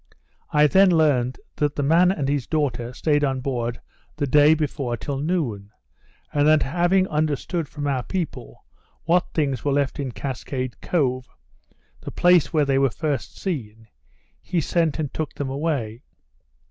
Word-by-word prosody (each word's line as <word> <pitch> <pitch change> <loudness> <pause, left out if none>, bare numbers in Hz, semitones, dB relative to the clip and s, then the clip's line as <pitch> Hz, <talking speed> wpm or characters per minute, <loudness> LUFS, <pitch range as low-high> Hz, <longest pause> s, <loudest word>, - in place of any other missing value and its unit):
I 150 0 +4
then 190 +5 +5
learnt 145 -7 +2 0.2
that 150 -1 0
the 145 - -1
man 170 +5 +4
and 150 -8 -2
his 140 -2 -1
daughter 125 -6 -1
stayed 145 +3 +1
on 135 -2 0
board 120 -3 -3 0.4
the 145 - 0
day 145 +3 +5
before 140 -5 -2
till 135 +5 -4
noon; 140 - -2 0.6
and 145 0 +3
that 155 0 +5
having 175 +6 +2
understood 155 +1 -1
from 145 -1 -6
our 135 -3 0
people 180 +4 -5 0.4
what 175 +3 +1
things 140 -6 0
were 145 - +1
left 140 0 0
in 135 -3 -3
Cascade 130 0 -5
Cove, 130 -6 -1 0.7
the - - -8
place 175 -2 +3
where 150 -3 +2
they 135 -1 +2
were 135 -1 +3
first 145 0 -3
seen, 115 - -5 0.5
he 180 - -1
sent 165 -1 0
and 150 -4 -3
took 155 -2 -4
them 135 -2 -3
away. 135 -6 -2
145 Hz, 160 wpm, -23 LUFS, 130-160 Hz, 0.7 s, then